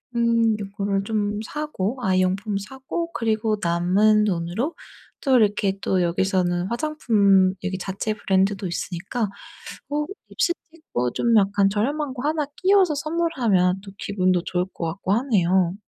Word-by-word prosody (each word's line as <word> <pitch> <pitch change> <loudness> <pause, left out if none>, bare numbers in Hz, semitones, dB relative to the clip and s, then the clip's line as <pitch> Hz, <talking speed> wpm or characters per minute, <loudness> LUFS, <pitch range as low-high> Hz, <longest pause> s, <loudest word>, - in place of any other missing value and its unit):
음 230 -2 +3
이거를 200 0 -2
좀 210 0 -1
사고 270 -6 -3
아이 185 -4 +2
용품 195 +3 0
사고 265 - -5
그리고 220 -3 0
남은 185 +5 +3
돈으로 190 - -2 0.5
또 265 -2 +4
이렇게 200 -2 +1
또 185 -1 +1
여기서는 175 0 0
화장품 215 -8 +2
여기 190 0 -2
자체 195 +3 -3
브랜드도 195 -1 0
있으니까 190 +5 -3 0.6
어 295 +1 -1 0.2
립스틱도 320 - -2
좀 235 -1 +2
약간 200 0 +3
저렴한 270 +7 -1
거 265 +3 -2
1 310 -1 0
끼워서 375 -3 +4
선물하면 255 - +1
또 195 -1 -11
기분도 185 -3 +1
좋을 180 +1 -1
것 165 - -3
같고 185 +3 -2
하네요. 190 -7 +2
205 Hz, 285 characters per minute, -23 LUFS, 185-245 Hz, 0.6 s, 또